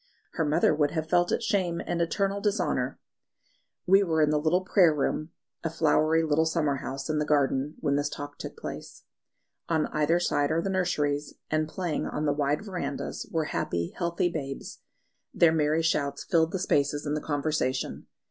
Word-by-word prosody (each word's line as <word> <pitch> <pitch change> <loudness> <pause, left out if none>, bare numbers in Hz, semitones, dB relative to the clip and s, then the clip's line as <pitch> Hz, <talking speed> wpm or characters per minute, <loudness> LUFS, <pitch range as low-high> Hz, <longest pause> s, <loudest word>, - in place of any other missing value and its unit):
"Her 165 - 0
mother 155 +2 +3
would 150 -1 +2
have 160 0 -3
felt 175 +1 +2
it - - 0
shame 185 -6 0
and 170 -1 -1
eternal 195 +4 0
dishonour." 180 -11 0 0.9
We 195 +2 +6
were 165 -5 +1
in 150 - +3
the 150 - +2
little 160 +4 +2
prayer 180 -3 +5
room, 155 +2 -1 0.3
a 165 - 0
flowery 160 0 +2
little 160 +1 +2
summer 150 -4 +1
house 135 0 -5
in 155 -1 0
the - - +1
garden, 145 -1 +1
when 140 -2 +1
this 145 0 0
talk 145 0 -8
took - - -7
place. - - -8 0.7
On 160 -2 +2
either 155 +3 +2
side 145 -4 +1
are 160 - +1
the 195 +3 -1
nurseries, 150 -6 -1 0.2
and 155 0 +1
playing 175 -3 -2
on 150 - -2
the 145 - +2
wide 145 +5 0
verandahs 175 -8 -4
were 160 -2 -1
happy, 85 0 -2
healthy 170 +1 0
babes; 140 -5 -5 0.6
their 165 -2 +5
merry 155 +1 +2
shouts 140 -3 0
filled 165 -3 +2
the - - -1
spaces 145 -5 0
in 145 - -1
the 150 - -1
conversation. 145 -3 -2
155 Hz, 180 wpm, -27 LUFS, 145-170 Hz, 0.9 s, We